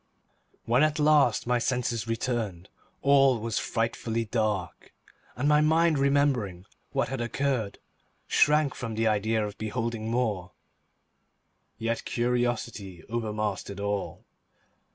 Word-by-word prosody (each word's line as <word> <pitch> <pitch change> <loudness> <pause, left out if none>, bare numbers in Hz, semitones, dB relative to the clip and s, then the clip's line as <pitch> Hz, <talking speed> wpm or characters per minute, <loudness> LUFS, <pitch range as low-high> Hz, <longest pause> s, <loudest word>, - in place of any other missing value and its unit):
When 120 +3 +3
at 155 0 +2
last 150 -6 +4
my 125 0 +1
senses 120 -2 -1
returned, 115 -6 -2 0.3
all 135 -2 +5
was 115 0 -2
frightfully 115 0 -2
dark, 105 -5 -2 0.4
and 135 +4 -1
my 150 0 +5
mind 160 0 +3
remembering 135 -10 +1 0.3
what - - 0
had 135 -2 -3
occurred, 120 -3 -1 0.5
shrank 150 -2 +3
from 115 -3 -5
the 115 +1 0
idea 110 0 +1
of 105 0 -8
beholding 115 0 -3
more; 105 -7 -1 1.2
yet 115 0 -2
curiosity 120 -6 -2
overmastered 105 -3 -3
all. 100 -1 -3
115 Hz, 110 wpm, -27 LUFS, 105-130 Hz, 1.2 s, all